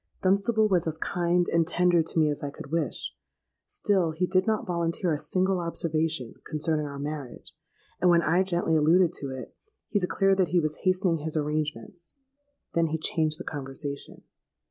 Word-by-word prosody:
Dunstable 215 +4 +3
was 180 -5 +1
as 160 -1 -2
kind 175 0 +1
and 165 -1 +2
tender 175 -1 +3
to 160 - -3
me 155 -1 +4
as 145 - -4
I 145 - -3
could 140 0 -11
wish: 160 -6 -2 0.5
still 185 -6 +1
he 180 +3 0
did 185 +2 +1
not 220 -1 +1
volunteer 170 0 -1
a 150 - +1
single 185 +2 0
observation 160 -6 -1
concerning 155 -1 -1
our 140 -1 -7
marriage; 145 -3 -6 0.5
and, 180 - +5
when 170 -1 +5
I 170 +5 +3
gently 175 -3 +1
alluded 165 +3 +4
to 140 - -5
it, 130 -1 -8 0.3
he 205 - +1
declared 195 +1 +2
that 185 - +4
he 175 - +2
was 155 -2 -1
hastening 185 -2 +1
his 155 +1 -2
arrangements. 155 +3 -3 0.6
Then 165 -1 +2
he 160 +1 -1
changed 155 -1 0
the - - -7
conversation. 140 0 -5
165 Hz, 175 wpm, -27 LUFS, 155-180 Hz, 0.6 s, and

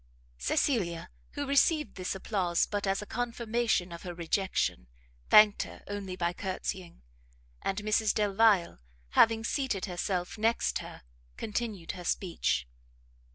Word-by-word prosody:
Cecilia, 170 - 0 0.2
who 285 - -3
received 300 +3 +3
this 185 +1 -3
applause 185 -3 0
but 205 -1 -3
as 195 +1 0
a - - -9
confirmation 235 -5 -1
of 170 - -8
her 175 -1 -6
rejection, 170 - -1 0.4
thanked 210 -1 +7
her - - -8
only 200 -2 -5
by 175 -1 -1
courtsying; 185 - -5 0.6
and 195 - -2
Mrs 215 0 +2
Delvile, 205 - +3 0.3
having 225 - +4
seated 240 -5 -1
herself 180 +1 -3
next 225 +2 +1
her, - - -10 0.3
continued 210 -5 -3
her 180 -1 -8
speech. 170 - -1
195 Hz, 125 wpm, -30 LUFS, 180-225 Hz, 0.6 s, thanked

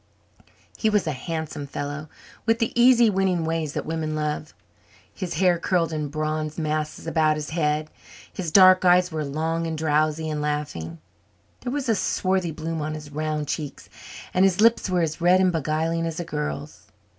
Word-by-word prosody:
He 220 - +2
was 210 -3 +2
a 155 - 0
handsome 150 +1 -5
fellow, 145 +2 -5 0.4
with 225 0 +4
the 230 -1 0
easy, 240 -1 +6
winning 190 -4 +1
ways 160 -2 -2
that - - -3
women 155 -1 -2
love. 150 0 -3 0.6
His 185 -5 -5
hair 175 0 +3
curled 170 -3 0
in 150 -1 -2
bronze 155 +1 -3
masses 155 -1 -2
about 155 -2 +2
his 150 0 -5
head; 155 -1 0 0.4
his 175 -4 -4
dark 185 +1 +7
eyes 180 0 +4
were 155 -1 -2
long 160 +3 -2
and 160 -1 -3
drowsy 155 0 +1
and 150 -1 -2
laughing; 150 - -3 0.6
there 245 - -4
was 280 -1 -2
a 225 - +4
swarthy 185 -3 0
bloom 160 0 -4
on 155 +1 -3
his 150 -1 -9
round 155 0 -2
cheeks; 150 -1 -5 0.4
and 185 - +3
his 195 -1 +3
lips 230 -2 +4
were 180 -1 +2
as 160 +1 -2
red 180 +2 +5
and 185 -1 +3
beguiling 165 +1 -1
as 165 0 -4
a 175 - -3
girl's. 75 - -5
160 Hz, 180 wpm, -24 LUFS, 150-180 Hz, 0.6 s, dark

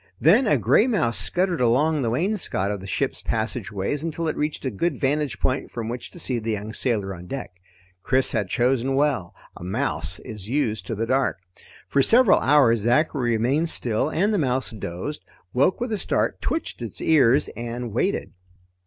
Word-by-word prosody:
Then 255 -1 +5
a - - +4
gray 225 - +3
mouse 120 - +1
scuttered 175 - 0
along 145 +6 +2
the 120 - 0
wainscot 160 - 0
of 105 - -3
the 95 - -9
ship's - - -1
passageways 110 +2 -2
until 165 0 -3
it 155 - -1
reached 150 -1 -3
a 130 - -1
good 145 - -1
vantage 145 +1 0
point 130 +1 -1
from 115 -2 -5
which 120 0 -5
to - - -14
see 130 -7 -2
the 110 0 -2
young 105 +1 -5
sailor 105 -7 0
on 90 0 -10
deck. 135 -3 -5 0.5
Chris 130 +5 +2
had 105 -5 -1
chosen 130 +3 +1
well; 135 -11 0 0.2
a - - -10
mouse 95 -2 -1
is 105 -4 -8
used 120 -6 -1
to 115 - -3
the 115 +2 -1
dark. 130 -2 +1 0.5
For 140 - +2
several 235 - +5
hours 130 -5 +4
Zachary 120 +2 +1
remained 140 +9 +1
still 120 +2 0
and 195 +7 +1
the 205 - +1
mouse 130 -3 0
dozed, 105 - -6 0.3
woke 135 +9 +2
with 240 0 -3
a 215 - -1
start, - - 0
twitched 320 - -3
its 115 -4 -6
ears, 140 -3 +4
and 120 0 -5
waited. 190 - -1
125 Hz, 185 wpm, -24 LUFS, 110-150 Hz, 0.5 s, Then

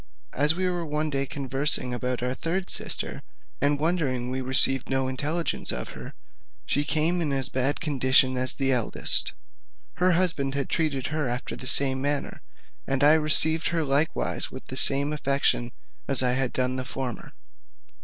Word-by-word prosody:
As 150 +4 +2
we 185 +1 -2
were 175 -1 -3
one 155 0 -3
day 140 -1 -2
conversing 135 -1 +2
about 125 0 -4
our 125 0 -2
third 180 +6 -3
sister, - - +1 0.4
and 145 +1 +1
wondering 145 -7 -1
we 130 0 -4
received 130 0 +3
no 135 0 -1
intelligence 150 +6 -1
of - - -5
her, - - -11 0.5
she 145 - 0
came 160 +4 0
in 150 -4 -2
as 135 -2 -1
bad 130 +3 0
a - - -22
condition 130 -3 +2
as 130 0 +2
the 135 -1 -1
eldest: 125 -4 +2 0.6
her 180 +2 +2
husband 165 -6 +1
had 140 -1 -3
treated 150 -6 -2
her 155 -5 -2
after 125 +1 -5
the 130 - -7
same 130 -1 +4
manner; 145 0 -3 0.5
and 135 +1 -1
I 150 +1 +6
received 160 +1 +3
her 165 -1 -1
likewise 145 +2 -1
with - - -11
the 130 - -6
same 140 +2 +3
affection 140 -4 -1 0.4
as 135 -1 +4
I 125 - +2
had 130 0 -1
done 130 0 -2
the 130 - -4
former. 125 -2 -7
140 Hz, 175 wpm, -24 LUFS, 130-155 Hz, 0.6 s, I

